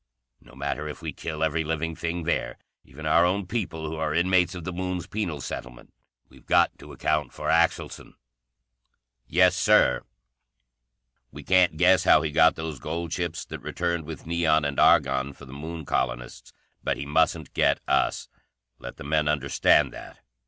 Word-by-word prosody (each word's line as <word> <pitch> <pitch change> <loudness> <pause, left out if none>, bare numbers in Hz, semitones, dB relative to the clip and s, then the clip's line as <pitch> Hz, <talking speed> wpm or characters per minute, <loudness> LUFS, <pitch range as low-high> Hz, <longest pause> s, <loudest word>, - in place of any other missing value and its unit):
No 65 - -19
matter 70 +2 -3
if 75 +2 -8
we 80 -3 -4
kill 80 +1 -4
every 80 +1 0
living 80 +1 -3
thing 85 +1 -3
there, 85 - -2 0.3
even 75 +4 -11
our 85 +2 +4
own 95 +3 +1
people 90 -6 -4
who 80 +1 -5
are 80 -1 -2
inmates 90 0 +2
of 90 - -7
the 90 - -5
Moon's 90 -1 -3
penal 85 -9 -4
settlement, 65 0 -8 0.3
we've - - -20
got - - +3
to - - -12
account 75 -1 -1
for - - -4
Axelson." - - 0 1.1
"Yes, 90 +4 +4
Sir." 105 -7 +4 1.3
"We - - -10
can't 90 -3 +3
guess 90 +2 +4
how 75 - +5
he 80 - -2
got 80 +1 +5
those 80 -4 -5
gold 85 +4 -4
ships 85 -2 -3
that - - -8
returned 85 -2 -3
with 80 -2 -8
neon 80 -2 +2
and 70 -1 -2
argon 65 +1 +3
for 70 - -14
the 65 - -12
Moon 80 +2 -7
colonists. - - -3 0.3
But - - -1
he 70 - -5
mustn't 80 0 0
get - - +2
us. - - +1 0.5
Let - - -9
the - - -9
men 75 +1 0
understand 75 -2 +2
that. - - -11
80 Hz, 170 wpm, -25 LUFS, 75-85 Hz, 1.3 s, how